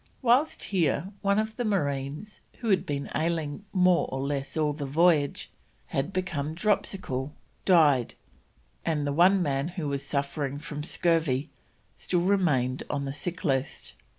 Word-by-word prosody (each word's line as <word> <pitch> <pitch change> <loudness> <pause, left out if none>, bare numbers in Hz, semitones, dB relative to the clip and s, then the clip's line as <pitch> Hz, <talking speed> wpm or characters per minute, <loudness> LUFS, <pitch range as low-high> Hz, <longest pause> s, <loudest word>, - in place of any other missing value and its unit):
Whilst 255 +6 +3
here 175 -2 0
one 200 0 +2
of 220 0 -1
the 245 - -1
marines, 150 - -2 0.2
who 235 - -3
had 190 - +2
been 140 -1 -2
ailing 160 +2 -2
more 180 -2 +3
or 135 - -3
less 135 0 -3
all 150 -1 +1
the 145 -1 -5
voyage, 155 0 +2 0.4
and 135 - 0
had 185 - -10
become 160 -5 -2
dropsical, 175 -8 -1 0.3
died, 150 - +4 0.7
and 155 -3 0
the 145 - -1
one 180 +4 +5
man 140 -1 0
who 175 -3 -4
was 140 -1 -2
suffering 140 0 -2
from 150 0 -6
scurvy 155 -4 +1 0.4
still 175 -2 -1
remained 155 -10 +2
on 140 -1 -2
the 135 - -3
sick 175 +6 -4
list. 135 -3 -1
155 Hz, 150 wpm, -27 LUFS, 140-185 Hz, 0.7 s, one